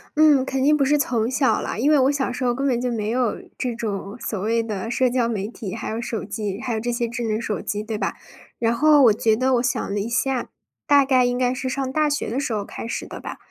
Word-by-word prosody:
嗯， 300 -3 +5
肯 265 -1 -1
定 300 +2 +5
不 285 - +2
是 295 +2 +3
从 235 -5 0
小 265 0 +2
啦。 - - -4
因 280 +6 +2
为 295 - +5
我 265 +2 +4
小 270 -3 -1
时 255 +1 -4
候 245 -1 +2
根 275 +1 -1
本 245 -2 +1
就 250 - -1
没 215 -2 -2
有 245 -2 0 0.2
这 245 -2 -2
种 210 -1 -4
所 210 -4 -3
谓 230 +3 +1
的 215 -1 -4
社 255 0 +2
交 240 -1 +1
媒 210 -4 -2
体， 220 -4 -7
还 225 - -5
有 225 +2 -3
手 230 -2 -4
机， 205 -1 -4
还 245 -3 -2
有 220 - -1
这 240 +2 -2
些 235 0 -1
智 240 +1 -4
能 220 -1 -1
手 210 -7 -3
机， 210 0 -3
对 220 -1 -4
吧？ 195 - -2 0.4
然 230 0 +1
后 295 +2 +5
我 225 - +7
觉 220 +1 +2
得 255 +2 +2
我 240 - +2
想 240 -5 -1
了 205 - -1
一 215 +4 -3
下， 255 +1 0 0.4
大 285 -1 +6
概 255 -2 +4
应 245 0 0
该 250 0 +1
是 260 0 -3
上 260 0 -2
大 305 +1 +2
学 290 - -2
的 250 +4 -1
时 260 -5 -2
候 205 -2 -2
开 - - -7
始 - - -4
的 - - -8
吧。 - - -7
240 Hz, 300 characters per minute, -23 LUFS, 220-265 Hz, 0.4 s, 我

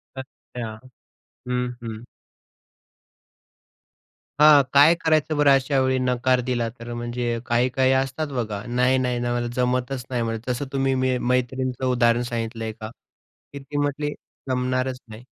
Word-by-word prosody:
अच्छा! 120 -4 -8 0.7
हं, 125 0 -1
हं. 115 0 -7 2.4
हां, 150 -1 +8
काय 145 +4 +7
करायचं 155 -2 +1
बरं 145 -1 +5
अशा 135 0 +3
वेळी 130 0 +1
नकार 125 0 +1
दिला 120 -2 0
तर? 115 +1 -10
म्हणजे 120 0 -3
अ, - - -4
काही-काही 130 +2 +2
असतात 135 +4 -3
बघा, 110 -5 -3
"नाही, 125 +2 +2
नाही, 125 -1 0
नाही, 120 0 -1
मला 120 0 -1
जमतच 125 0 -1
नाही 125 -2 -1
म्हणे." 115 0 -2
तसं 125 +3 -1
तुम्ही 135 0 +1 0.3
मैत्रीणंचं 125 +1 -1
उदाहरण 120 -1 +3
सांगितलंय 115 -1 -3
का, 110 0 -8 0.6
की 140 - -6
ती 140 +1 -8
म्हटली, 145 +1 -1 0.4
"जमणारच 130 0 -1
नाही." 110 +2 -11
125 Hz, 135 wpm, -23 LUFS, 120-135 Hz, 2.4 s, हां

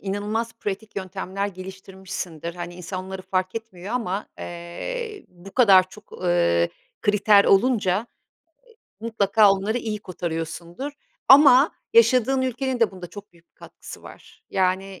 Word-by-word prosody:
inanılmaz 210 +4 -3
pratik 205 +1 -5
yöntemler 190 +1 -4
geliştirmişsindir. 185 -3 -7
Hani, 175 0 -7
insanları 185 +1 -6
fark 185 +1 -2
etmiyor 220 -2 -6
ama, 200 -5 -2
eee, 405 - -6
bu 180 +2 -15
kadar 195 -7 +6
çok, 210 +3 -16
ııı, 85 - +2 0.3
kriter 205 0 +5
olunca, 195 -3 +3 1.0
eee, 230 - -4
mutlaka 210 -1 +4
onları 200 +5 0
iyi 215 -3 -4
kotarıyorsundur 170 - -5 0.4
ama 275 0 +8 0.2
yaşadığın 265 - +4
ülkenin 255 0 -2
de 225 - +4
bunda 185 -2 -9
çok 205 +3 -12
büyük 170 0 -25
bir - - -61
katkısı - - -12
var. - - -15
Yani, 190 0 -1
195 Hz, 130 wpm, -23 LUFS, 185-225 Hz, 1.0 s, ama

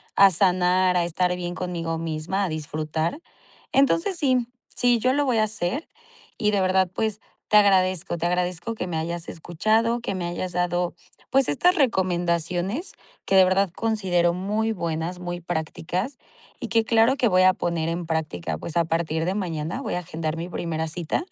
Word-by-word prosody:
a 195 0 +8
sanar, 180 0 +3
a 175 - +2
estar 180 +1 0
bien 175 -1 -4
conmigo 170 -3 -3
misma, 165 +4 -2
a 180 - -2
disfrutar. 155 - -3 0.5
Entonces 330 +7 +3
sí, 255 -6 +2 0.3
sí, 245 -1 +3
yo 255 +3 +2
lo 290 +1 +1
voy 250 -4 +1
a - - +4
hacer 215 - -2 0.5
y 210 -2 +1
de 200 -2 +1
verdad, 185 0 +2
pues 215 -1 -1 0.3
te 210 - +6
agradezco. 185 -4 +3
Te 170 - -2
agradezco 180 +4 -1
que 185 - -4
me 170 - -4
hayas 170 +1 -3
escuchado, 220 +8 0
que 200 - -3
me 180 -2 -3
hayas 175 +1 -4
dado, 180 0 0 0.4
pues, 270 0 +3
estas 360 - +3
recomendaciones 180 - 0 0.3
que 195 - +1
de 190 - +8
verdad 190 +1 +2
considero 190 -6 +1
muy 210 +5 -1
buenas, 170 -1 -3
muy 175 0 -5
prácticas 175 - -3 0.4
y 240 - -5
que 225 0 +2
claro 230 +3 +4
que 245 - +3
voy 185 -3 +4
a 185 - +7
poner 170 -4 -2
en 170 +1 -3
práctica. 150 - -2
Pues 155 - -5
a 170 - +3
partir 160 -1 -1
de 185 - 0
mañana 165 -4 -3
voy - - -3
a 180 - 0
agendar 160 -1 -4
mi 170 +2 -4
primera 160 -2 -3
cita. 170 - -3
180 Hz, 180 wpm, -24 LUFS, 170-210 Hz, 0.5 s, a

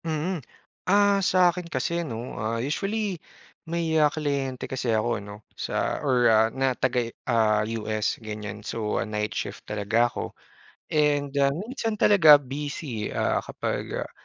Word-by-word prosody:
Mm. 160 +2 -2 0.5
Ah, 200 0 +4
sa 180 -1 +4
akin 180 -1 -7
kasi 170 +5 -1
'no, 120 -6 -5
ah, 110 +2 -1
usually 195 - -2 0.5
may, 170 -1 -1
ah, 150 - +5
kliyente 140 -4 -2
kasi 130 -2 -3
ako 110 0 +1
'no, 105 +1 -11
sa - - -2
or, 130 -4 +2
ah, 110 0 +5
na 130 +2 0
taga, 125 -2 -1 0.2
ah, 110 -3 +3
US 110 -1 -2
ganyan. 105 -2 -7
So, 110 -2 -2
night 105 -1 -2
shift - - -4
talaga 105 +3 +1
ako, - - -6 0.6
and, 145 -2 +2
ah, 140 - +5
minsan 220 - -3
talaga 170 -8 +8
busy 140 -4 -4
eh, - - -7
ah, - - +1
kapag, - - -3
ah, - - -12
130 Hz, 150 wpm, -26 LUFS, 110-160 Hz, 0.6 s, talaga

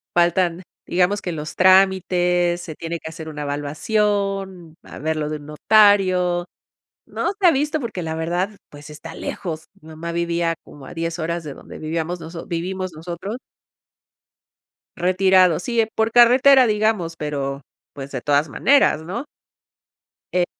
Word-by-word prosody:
faltan, 175 0 +2 0.2
digamos 185 +3 +1
que 180 - -4
los 155 -1 -6
trámites, 180 -2 +3
se 170 -2 -7
tiene 165 +2 -4
que 160 - -7
hacer 160 0 -8
una 150 -1 -6
evaluación, 190 +4 -2
a - - -12
ver 160 +2 -2
lo 150 -1 -2
de 155 - -3
un 145 - -13
notario, 185 0 +3 0.6
no - - -2
se 380 - +5
ha - - +7
visto 295 +2 0
porque 230 -8 -5
la 160 0 -3
verdad, 175 +4 -1 0.2
pues 145 +1 -12
está 155 +2 -10
lejos, 160 -4 -5
mi 155 - -16
mamá 160 +2 -6
vivía 170 0 -1
como 140 -2 -14
a - - -10
10 165 0 -3
horas 170 +1 -2
de 145 - -6
donde - - -12
vivíamos 165 +2 -3
noso 165 +1 -8
vivimos 185 +2 -3
nosotros. 175 +7 -6 1.6
Retirado, 185 -1 +4
sí, 235 -3 0
por 220 +1 +1
carretera, 255 +2 +6
digamos, 210 -6 0
pero 140 -3 -4 0.3
pues, 140 0 -8
de 130 - -4
todas 145 +2 +1
maneras, 275 - +3
¿no? 190 - -5 1.1
Eh, 180 -1 +2
175 Hz, 150 wpm, -21 LUFS, 160-195 Hz, 1.6 s, ha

